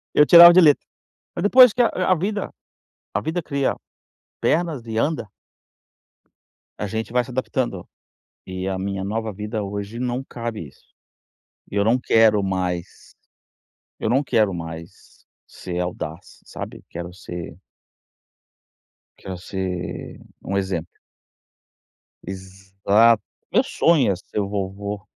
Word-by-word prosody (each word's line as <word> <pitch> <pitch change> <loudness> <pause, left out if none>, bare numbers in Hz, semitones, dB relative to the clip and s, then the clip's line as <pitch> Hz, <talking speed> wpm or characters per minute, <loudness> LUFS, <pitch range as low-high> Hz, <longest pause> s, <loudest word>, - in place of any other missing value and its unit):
Eu 150 - +7
tirava 170 +2 +10
de 185 - +7
letra. 150 -4 +4 0.5
Mas 175 - -3
depois 250 +3 +7
que 245 - +2
a 230 - +4 0.2
a - - +7
vida 200 +4 -3 0.6
a 105 - 0
vida 165 +8 -2
cria 140 -3 -1 0.7
pernas 155 -7 0
e 110 -1 -4
anda. 115 -4 -1 1.5
A 105 - -2
gente 110 +1 -4
vai 125 0 +2
se 130 - -11
adaptando. 120 -6 -2 0.6
E 95 0 -5
a 95 -1 -2
minha 100 0 -3
nova 110 +2 -3
vida, 105 +2 -4
hoje, 100 +3 -5
não 125 +1 -2
cabe 115 - -6
isso, 65 - -22 0.9
e - - -9
eu 100 - +3
não 115 +4 +3
quero 110 -4 +4
mais 90 -2 -4 0.9
eu - - -1
não 130 +5 +2
quero 110 -7 +2
mais 80 -1 -9 0.2
ser 90 -1 -6
audaz, 90 -1 -6
sabe, - - -8
quero 85 +1 -7
ser 85 -3 -8 1.6
Quero 95 - -7
ser 90 -1 -5 0.2
um 100 - -2
exemplo. 95 -4 -3 1.3
Exat 95 +4 +1 0.3
Meu 245 +7 +4
sonho 165 - +3
é - - 0
ser 90 +3 -6
o 100 - -1
vovô. 100 +1 -4
105 Hz, 130 wpm, -22 LUFS, 95-125 Hz, 1.6 s, tirava